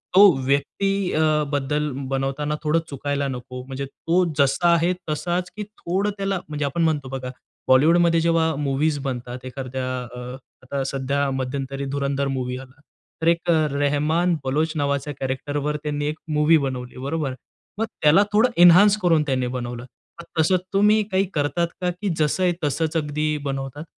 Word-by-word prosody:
तो 200 +2 +9 0.2
व्यक्ती 185 +8 0
अ, 155 -1 +2
बद्दल 150 +1 0 0.2
बनवताना 135 +3 -1
थोडं 155 +2 +2
चुकायला 140 0 -2
नको. 125 -1 -6
म्हणजे 135 +1 -5
तो 165 +6 0
जसा 150 +5 +3
आहे 170 +2 +2 0.2
तसाच 175 +4 -1
की 210 - -4
थोडं 200 -1 -2
त्याला 195 -1 -1
म्हणजे 150 -1 -2
आपण 155 +5 -1
म्हणतो 150 -5 0
बघा 130 -1 -5 0.4
बॉलिवूडमध्ये 165 +5 +5
जेव्हा 165 -1 +2
मूवीज 145 +2 0
बनतात, 125 -2 -5
एखाद्या 130 0 -5 0.3
अ, - - -7 0.4
आता 135 +1 -3
सध्या 140 +1 -1
मध्यंतरी 135 +1 -3
धुरंधर 140 0 -1
मूव्ही 125 -2 -2
आला, 130 +1 -13 0.4
तर 160 - 0
एक 170 0 +2 0.2
रेहमान 150 +5 +1
बलोच 150 +4 0
नावाच्या 140 0 -1
कॅरेक्टरवर 145 +3 -2
त्यांनी 145 -1 -2
एक 155 +1 -3
मूव्ही 150 +2 +5
बनवली, 130 -4 -4
बरोबर? 140 +1 -2 0.4
मग 225 - 0 0.2
त्याला 155 +7 +6
थोडं 220 +4 +4
एन्हान्स 190 +4 +8
करून 165 -4 +4
त्यांनी 130 -3 0
बनवलं. 120 -1 -5 0.4
मग - - -14
तसं 160 +4 +4 0.2
तुम्ही 210 +2 +4
काही 190 +1 +2
करतात 160 +3 0
का? 180 - +1
की 180 +3 -3
जसं 155 +4 +1
आहे 180 -1 +3
तसंच 155 +2 0
अगदी 150 0 -1 0.2
बनवतात? 135 +1 -4
145 Hz, 155 wpm, -23 LUFS, 135-170 Hz, 0.4 s, तो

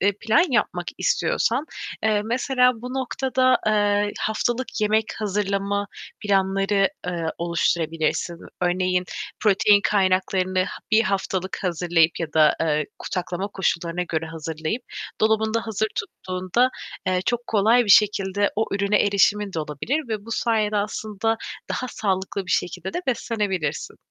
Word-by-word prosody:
eee, 200 +2 +3
plan 230 +10 +4
yapmak 180 -7 0
istiyorsan, 300 - +1 0.4
eee, 215 -1 +2
mesela 250 +2 +2
bu 250 +1 -5
noktada, 260 0 +1
eee, 205 -1 +2
haftalık 235 +3 -1
yemek 215 +1 +3
hazırlama 200 -1 -1 0.3
planları, 195 0 +2 0.2
eee, 175 -2 -2
oluşturabilirsin. 170 0 0 0.2
Örneğin 180 0 +1 0.4
protein 205 0 +5
kaynaklarını 185 -1 +1
ha - - -7
1 215 +1 +5
haftalık 190 -2 -2
hazırlayıp 170 -2 +2
ya 155 -2 -3
da, 155 -1 +5
eee, 155 -2 +1
ku - - -9
saklama 180 +2 -3
koşullarına 175 -3 -1
göre 160 0 -2
hazırlayıp 160 +7 -4 0.4
dolabında 220 +1 +1
hazır 220 0 -1
tuttuğunda, 185 +7 -1 0.4
eee, 185 -1 +2
çok 240 0 -1
kolay 225 +3 +4
bir 205 - 0
şekilde 200 -1 +4
o 220 - +2
ürüne 200 +1 +2
erişimin 205 0 +2
de 165 - -3
olabilir 225 - -3
ve 215 -2 -3
bu 230 - -10
sayede 215 -3 +1
aslında 215 +1 -1 0.3
daha 255 - -2
sağlıklı 190 -2 -2
bir - - -6
şekilde 180 +2 -1
de 360 - -3
beslenebilirsin. 200 - -2
200 Hz, 130 wpm, -23 LUFS, 180-220 Hz, 0.4 s, protein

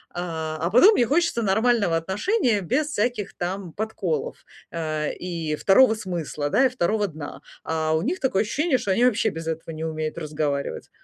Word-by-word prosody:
а 160 -2 -3
потом 255 - +7
мне 240 - +3
хочется 300 -2 +1
нормального 215 -2 +2
отношения 210 - 0
без 260 - 0
всяких 235 -6 -2
там 180 -1 -4
подколов, 195 -8 -3 0.3
э, 155 -2 -2
и 165 -4 -3
второго 220 +9 +5
смысла, 175 -8 -4
да, 265 - +4
и - - +4
второго 215 -3 0
дна, 155 -4 -8 0.2
а 160 -1 -1
у 160 - +1
них 345 - -2
такое 255 -8 +1
ощущение, 265 +5 0
что - - -5
они 220 +6 +3
вообще 225 -2 +2
без 165 -4 -7
этого 160 0 -4
не 155 - -5
умеют 155 -1 -3
разговаривать. 150 -3 -3
190 Hz, 170 wpm, -24 LUFS, 160-235 Hz, 0.3 s, потом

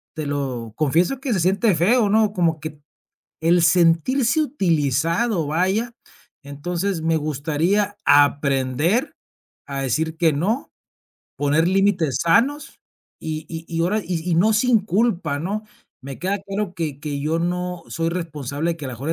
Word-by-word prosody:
te 155 - -4
lo 130 -6 -3
confieso 165 - +1
que 265 -2 -2
se 190 - 0
siente 195 +4 +2
feo, 205 +6 +3
¿no?, 215 -1 +3
como 165 -5 +1
que 155 0 -5
t 150 -1 -24 0.6
el 170 +2 +3
sentirse 185 - +3
utilizado, 170 - 0
vaya. 190 +9 0 0.5
Entonces, 170 +5 -3
me 160 0 +1
gustaría 160 +8 0
aprender 145 - +2 0.5
a 140 -1 -4
decir 160 +5 -1
que 165 -2 +3
no, 200 - -1 0.7
poner 145 +3 +2
límites 185 -8 +1
sanos, 275 - +1 0.4
y 155 0 -5
y 165 0 -7
y 165 -1 -2
ahora 205 +5 +1
y 175 0 -3
y, 165 - +2
no, 210 +6 +4
sin 240 +1 +4
culpa, 190 -7 0
¿no? 205 +5 -3 0.4
Me 135 0 -8
queda 195 +3 -1
claro 195 -1 -3
que 155 -5 -4
que 145 -2 -4
yo 155 +3 0
no 180 0 -2
soy 165 0 -2
responsable 160 -2 -3
de 165 - -8
que 145 - -6
a - - -5
lo 130 - -6
mejor 135 +6 -6
y - - +3
165 Hz, 160 wpm, -22 LUFS, 150-200 Hz, 0.7 s, no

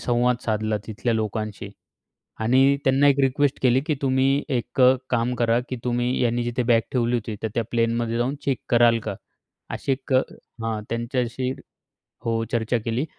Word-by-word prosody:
संवाद 120 0 +1
साधला 110 -1 0
तिथल्या 115 +2 -2
लोकांशी 110 -2 -3 0.7
आणि 130 +5 +4
त्यांना 135 +2 +4
एक 140 0 +3
रिक्वेस्ट 140 +1 +1
केली 130 0 +4
की 155 - +1
"तुम्ही 135 +1 +2
एक 120 +2 -2
अ, 125 +1 +7 0.2
काम 120 0 +1
करा 115 0 +2
की 130 - -3
तुम्ही 120 0 0
यांनी 120 0 +1
जिथे 120 +1 -1
बॅग 115 - +5
ठेवली 120 -1 +1
होती, 110 -1 -4
तर 110 - 0
त्या 115 - 0
प्लेनमध्ये 115 0 0
जाऊन 125 +3 0
चेक 135 -4 0
कराल 120 -1 +5
का?" - - -3 0.6
अशी 135 - -2
एक 135 0 -4
हां, 115 -4 -2
त्यांच्याशी 120 +2 -2 0.7
हो, 115 -1 0
चर्चा 115 +1 +1
केली 115 +4 -1
120 Hz, 165 wpm, -24 LUFS, 115-130 Hz, 0.7 s, अ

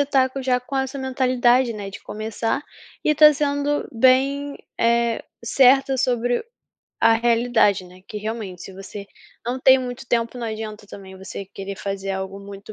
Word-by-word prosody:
está 275 -2 +3
com 270 - -5
já 250 -1 +2
com 250 +3 -9
essa 265 +1 -2
mentalidade, 255 -2 +2
né, 200 -2 -6
de 195 - -10
começar 225 +4 -3 0.4
e - - +3
está 300 0 +8
sendo 285 0 0
bem, 270 +4 +2 0.2
eh, 235 0 +2 0.2
certa 270 +2 +4
sobre 245 -1 +1 0.6
a 225 - +5
realidade, 230 -4 +2
né, 180 +1 -15
que 215 - -7
realmente, 210 -4 -5
se 195 - -9
você 195 +1 -9 0.4
não 250 +2 -3
tem 260 0 +7
muito 245 -2 -6
tempo, 235 +1 -1
não 235 - -3
adianta 215 -1 -6
também 190 -1 -11
você 190 +1 -7
querer 195 0 -8
fazer 195 0 -4
algo 190 +1 -5
muito 200 +1 -10
235 Hz, 165 wpm, -22 LUFS, 205-260 Hz, 0.6 s, está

